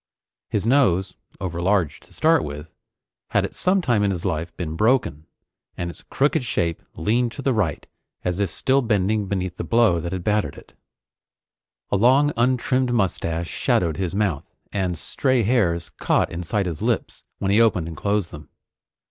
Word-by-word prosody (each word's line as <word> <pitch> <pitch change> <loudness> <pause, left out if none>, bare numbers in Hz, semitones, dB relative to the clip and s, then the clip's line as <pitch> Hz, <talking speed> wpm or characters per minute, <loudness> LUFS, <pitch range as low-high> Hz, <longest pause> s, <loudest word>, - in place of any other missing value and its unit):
His 105 - -1
nose, 95 -8 +3 0.3
overlarge 90 -2 0
to - - -23
start 160 -2 +3
with, 75 +2 -7 0.6
had - - +1
at - - -7
some 185 0 +2
time 120 -7 +2
in 100 - +2
his 90 -3 -3
life 85 -2 -2
been 80 -3 -4
broken, 105 - +1 0.5
and 85 0 -3
its - - -15
crooked 145 +1 0
shape 85 -8 -1
leaned 115 +8 +1
to - - -7
the 135 - +2
right 95 -10 -1 0.4
as 90 +1 -1
if 100 -3 +1
still 135 +9 +2
bending 105 -2 +1
beneath 95 -2 -3
the - - -3
blow 115 -7 +3
that 85 +1 -4
had 95 -2 -4
battered 105 -8 0
it. - - -15 1.2
A - - +3
long 135 +7 +4
untrimmed 125 +1 +1
mustache 85 -6 -1
shadowed 80 -4 0
his 95 -1 -2
mouth, 95 -9 -1 0.2
and 90 -4 -1
stray 130 - 0
hairs 95 -8 +1
caught - - 0
inside 90 +4 -2
his 85 -4 -4
lips - - -1
when 95 - -1
he 105 +3 +5
opened 95 -8 +2
and 80 - -6
closed 100 +1 -1
them. 75 -1 -11
100 Hz, 170 wpm, -23 LUFS, 85-120 Hz, 1.2 s, he